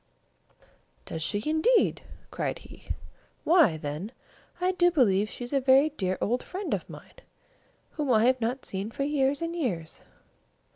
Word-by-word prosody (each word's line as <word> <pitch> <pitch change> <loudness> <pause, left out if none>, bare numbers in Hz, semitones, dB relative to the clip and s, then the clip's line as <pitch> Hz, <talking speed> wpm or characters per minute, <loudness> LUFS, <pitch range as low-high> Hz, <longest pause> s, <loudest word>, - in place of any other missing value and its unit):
"Does 160 - -6
she 205 +6 -1
indeed?" 315 +11 +3 0.3
cried - - -2
he. - - -15 0.6
"Why, 320 - +4
then, 155 +7 -5 0.5
I 365 +1 +2
do 355 -1 +3
believe 215 - +2
she - - -7
is 245 - -6
a 275 - +3
very 270 +3 +5
dear 190 -10 -2
old 245 +4 0
friend 380 +2 -4
of - - -3
mine, - - -12 0.7
whom 295 -3 -3
I 220 -1 +4
have 255 0 +3
not 245 +4 -2
seen 195 +2 -3
for 275 - -3
years 285 +1 +1
and 335 +1 -3
years. 185 - -3
260 Hz, 155 wpm, -27 LUFS, 205-310 Hz, 0.7 s, very